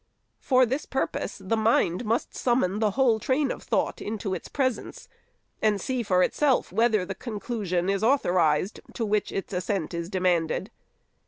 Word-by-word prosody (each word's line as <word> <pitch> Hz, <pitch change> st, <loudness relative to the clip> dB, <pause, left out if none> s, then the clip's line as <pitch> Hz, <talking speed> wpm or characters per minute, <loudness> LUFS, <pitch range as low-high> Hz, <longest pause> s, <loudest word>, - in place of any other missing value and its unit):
For 255 Hz, -1 st, +4 dB
this 265 Hz, +5 st, -3 dB
purpose, 270 Hz, -, -2 dB
the 195 Hz, +3 st, -1 dB
mind 220 Hz, -2 st, +2 dB
must 225 Hz, +3 st, -1 dB
summon 235 Hz, -6 st, +1 dB
the 215 Hz, -1 st, +3 dB
whole 240 Hz, -5 st, +4 dB
train 270 Hz, +5 st, +1 dB
of -, -, -6 dB
thought -, -, -1 dB
into 205 Hz, -2 st, -3 dB
its 185 Hz, -, -5 dB
presence, 260 Hz, -4 st, -2 dB, 0.5 s
and 210 Hz, -2 st, +2 dB
see 255 Hz, +2 st, -2 dB
for 185 Hz, -4 st, +3 dB
itself 280 Hz, +3 st, +1 dB
whether 220 Hz, -1 st, +2 dB
the 195 Hz, -, -4 dB
conclusion 205 Hz, -4 st, -3 dB
is 195 Hz, +1 st, 0 dB
authorized 185 Hz, -, +2 dB, 0.2 s
to 230 Hz, -, -1 dB
which 210 Hz, -1 st, 0 dB
its 195 Hz, +1 st, -4 dB
assent 180 Hz, -2 st, -2 dB
is 170 Hz, 0 st, -4 dB
demanded. 180 Hz, -4 st, 0 dB
210 Hz, 160 wpm, -26 LUFS, 185-240 Hz, 0.5 s, For